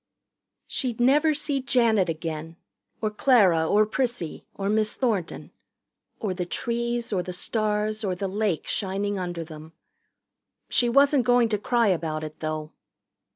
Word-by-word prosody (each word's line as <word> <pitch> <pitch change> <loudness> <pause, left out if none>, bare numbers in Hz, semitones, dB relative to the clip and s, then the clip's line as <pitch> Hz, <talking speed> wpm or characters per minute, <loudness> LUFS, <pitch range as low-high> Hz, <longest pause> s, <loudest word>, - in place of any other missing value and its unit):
She'd 245 -4 -3
never 295 +5 +4
see 285 -2 -1
Janet 235 -8 +2
again 160 0 -5 0.5
or 215 - +1
Clara 200 -9 +4
or 210 +4 +4
Prissy 235 -7 -3
or 195 - -3
Miss 215 +1 +1
Thornton 215 -10 -2 0.7
or 205 -4 -2
the 180 0 -3
trees 235 +3 -2
or 185 - +1
the 180 +1 -6
stars 215 +2 -1
or 190 -3 -1
the 195 +2 -3
lake 195 -3 -1
shining 200 0 -1
under 175 -2 -4
them. 155 0 -11 1.0
She 240 - +2
wasn't 275 0 +4
going 245 -2 +4
to 210 -2 0
cry 235 0 +2
about 160 -3 -1
it, 155 0 -8
though. 155 -1 -4
210 Hz, 145 wpm, -25 LUFS, 175-240 Hz, 1.0 s, never